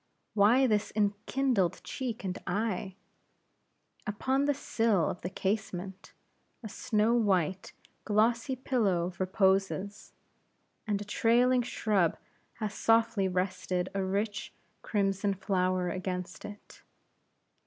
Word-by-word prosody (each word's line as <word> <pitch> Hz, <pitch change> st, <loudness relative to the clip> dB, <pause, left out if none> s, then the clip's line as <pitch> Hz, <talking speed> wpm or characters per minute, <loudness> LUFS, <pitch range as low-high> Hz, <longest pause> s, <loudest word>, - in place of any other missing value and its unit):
Why 220 Hz, +6 st, +5 dB
this 215 Hz, -4 st, +1 dB
enkindled 210 Hz, 0 st, +1 dB
cheek 245 Hz, -6 st, -4 dB
and 185 Hz, -2 st, -2 dB
eye? 190 Hz, -1 st, -2 dB, 1.1 s
Upon 260 Hz, +7 st, 0 dB
the 290 Hz, -, +3 dB
sill 225 Hz, -, +1 dB
of -, -, -4 dB
the 180 Hz, -, -3 dB
casement, 195 Hz, -1 st, -3 dB, 0.5 s
a 220 Hz, -, -6 dB
snow 215 Hz, +3 st, +1 dB
white 190 Hz, -6 st, +1 dB, 0.3 s
glossy 230 Hz, +5 st, +2 dB
pillow 200 Hz, -9 st, 0 dB
reposes, 195 Hz, +1 st, 0 dB, 0.7 s
and 205 Hz, -2 st, 0 dB
a -, -, -15 dB
trailing 245 Hz, +4 st, +3 dB
shrub 210 Hz, -7 st, +1 dB, 0.4 s
has 215 Hz, -2 st, -4 dB
softly 225 Hz, -3 st, +2 dB
rested 185 Hz, 0 st, -1 dB
a 195 Hz, -1 st, -1 dB
rich, 200 Hz, +2 st, -2 dB, 0.3 s
crimson 195 Hz, -1 st, 0 dB
flower 185 Hz, -1 st, 0 dB
against 180 Hz, -1 st, -4 dB
it. 205 Hz, 0 st, -11 dB
205 Hz, 105 wpm, -30 LUFS, 185-225 Hz, 1.1 s, Why